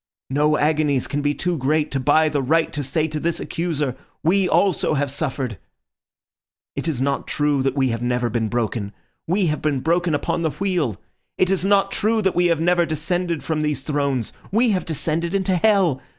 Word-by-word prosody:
No 150 Hz, +2 st, +2 dB
agonies 150 Hz, -3 st, +1 dB
can 145 Hz, +3 st, -2 dB
be 145 Hz, 0 st, 0 dB
too 175 Hz, -3 st, -2 dB
great 150 Hz, +3 st, +1 dB
to 135 Hz, -, -1 dB
buy 150 Hz, +4 st, +3 dB
the 145 Hz, -2 st, 0 dB
right 160 Hz, +5 st, +1 dB
to 145 Hz, -, -2 dB
say 150 Hz, +4 st, 0 dB
to 155 Hz, -1 st, -4 dB
this 170 Hz, +1 st, -1 dB
accuser, 150 Hz, -6 st, -2 dB, 0.3 s
'We 185 Hz, +2 st, +2 dB
also 190 Hz, -5 st, +2 dB
have 140 Hz, -1 st, 0 dB
suffered.' 135 Hz, -, -2 dB, 1.2 s
"It -, -, -3 dB
is 135 Hz, -6 st, -1 dB
not 140 Hz, 0 st, -1 dB
true 145 Hz, -2 st, +1 dB
that 135 Hz, 0 st, 0 dB
we 135 Hz, -2 st, +2 dB
have 115 Hz, 0 st, -2 dB
never 125 Hz, 0 st, 0 dB
been 115 Hz, -1 st, -1 dB
broken. 110 Hz, -3 st, -2 dB, 0.3 s
We 185 Hz, +3 st, +1 dB
have 150 Hz, -2 st, -1 dB
been 145 Hz, -3 st, 0 dB
broken 170 Hz, +1 st, +1 dB
upon 155 Hz, -, -1 dB
the 160 Hz, -, +1 dB
wheel. 165 Hz, -, -1 dB, 0.4 s
It 185 Hz, 0 st, +2 dB
is 190 Hz, -2 st, +1 dB
not 195 Hz, 0 st, +3 dB
true 220 Hz, +1 st, +1 dB
that 190 Hz, -, +2 dB
we 175 Hz, 0 st, +3 dB
have 170 Hz, -2 st, +1 dB
never 175 Hz, +1 st, +3 dB
descended 170 Hz, +1 st, -2 dB
from 155 Hz, -2 st, -1 dB
these 150 Hz, -3 st, -1 dB
thrones. 140 Hz, -6 st, -1 dB, 0.2 s
We 230 Hz, +3 st, +3 dB
have 185 Hz, -3 st, -1 dB
descended 165 Hz, +3 st, -2 dB
into 190 Hz, -1 st, +1 dB
hell. 180 Hz, -8 st, +3 dB
155 Hz, 195 wpm, -22 LUFS, 140-175 Hz, 1.2 s, buy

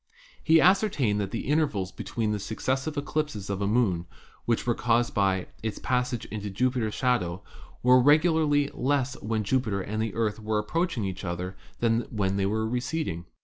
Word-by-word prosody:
He 160 Hz, 0 st, +6 dB
ascertained 160 Hz, -, +3 dB
that 100 Hz, -, -2 dB
the -, -, -4 dB
intervals 140 Hz, -11 st, 0 dB
between 105 Hz, -1 st, -2 dB
successive 130 Hz, +8 st, -2 dB
eclipses 145 Hz, -9 st, -2 dB
of 100 Hz, 0 st, -3 dB
a 100 Hz, -, +1 dB
moon, 100 Hz, -7 st, +1 dB, 0.4 s
which 115 Hz, -1 st, 0 dB
were 120 Hz, -, +2 dB
caused 120 Hz, 0 st, +1 dB
"by 95 Hz, -2 st, +1 dB, 0.2 s
its 110 Hz, -2 st, -3 dB
passage 125 Hz, -2 st, -1 dB
into 105 Hz, -1 st, -4 dB
Jupiter's 115 Hz, +1 st, 0 dB
shadow, 105 Hz, -9 st, 0 dB, 0.4 s
were 125 Hz, +1 st, +6 dB
regularly 150 Hz, 0 st, +4 dB
less 135 Hz, -1 st, 0 dB
when 110 Hz, 0 st, -1 dB
Jupiter 110 Hz, -2 st, 0 dB
and 105 Hz, +3 st, -3 dB
the 110 Hz, -2 st, -2 dB
Earth 110 Hz, -1 st, 0 dB
were 110 Hz, 0 st, -1 dB
approaching 125 Hz, -, -1 dB
each 95 Hz, 0 st, -5 dB
other 90 Hz, +1 st, -4 dB, 0.3 s
than 115 Hz, 0 st, +2 dB
when 100 Hz, -3 st, -1 dB
they 95 Hz, -1 st, +1 dB
were 110 Hz, +2 st, 0 dB
receding. 125 Hz, -, -2 dB
115 Hz, 165 wpm, -27 LUFS, 100-130 Hz, 0.4 s, He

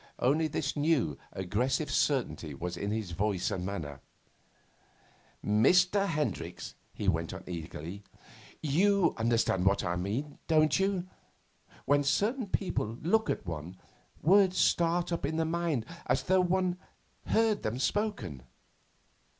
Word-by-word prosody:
Only 150 Hz, +6 st, +2 dB
this 145 Hz, -1 st, -2 dB
new 145 Hz, -, +1 dB, 0.2 s
aggressive 115 Hz, -, -1 dB
certainty 120 Hz, -, 0 dB
was 90 Hz, +5 st, -4 dB
in 100 Hz, -, -3 dB
his 105 Hz, -4 st, -3 dB
voice 100 Hz, 0 st, -1 dB
and 90 Hz, -, -2 dB
manner. 80 Hz, -8 st, -5 dB, 1.5 s
'Mr. 180 Hz, -, +4 dB
Hendricks,' 150 Hz, -, -3 dB, 0.2 s
he -, -, -5 dB
went -, -, 0 dB
on -, -, -8 dB
eagerly, 85 Hz, +2 st, -6 dB, 0.6 s
'you 180 Hz, +4 st, +3 dB
understand 115 Hz, -5 st, +1 dB
what 95 Hz, +1 st, +3 dB
I 85 Hz, -, -1 dB
mean, 115 Hz, +11 st, -3 dB
don't 155 Hz, 0 st, +4 dB
you? 190 Hz, -2 st, 0 dB, 0.8 s
When 145 Hz, +1 st, +3 dB
certain 215 Hz, -, +1 dB
people 120 Hz, -, -2 dB
look 220 Hz, +7 st, +2 dB
at -, -, -2 dB
one, 85 Hz, +1 st, -6 dB, 0.5 s
words 185 Hz, +2 st, +5 dB
start 170 Hz, +1 st, +2 dB
up 170 Hz, -, -2 dB
in 155 Hz, +3 st, -1 dB
the 165 Hz, -, +1 dB
mind 165 Hz, -7 st, -1 dB, 0.2 s
as -, -, +1 dB
though 185 Hz, 0 st, +3 dB
one 180 Hz, 0 st, +1 dB, 0.5 s
heard 220 Hz, -2 st, +2 dB
them 110 Hz, +3 st, -2 dB
spoken. 135 Hz, -, -1 dB
145 Hz, 130 wpm, -30 LUFS, -, 1.5 s, words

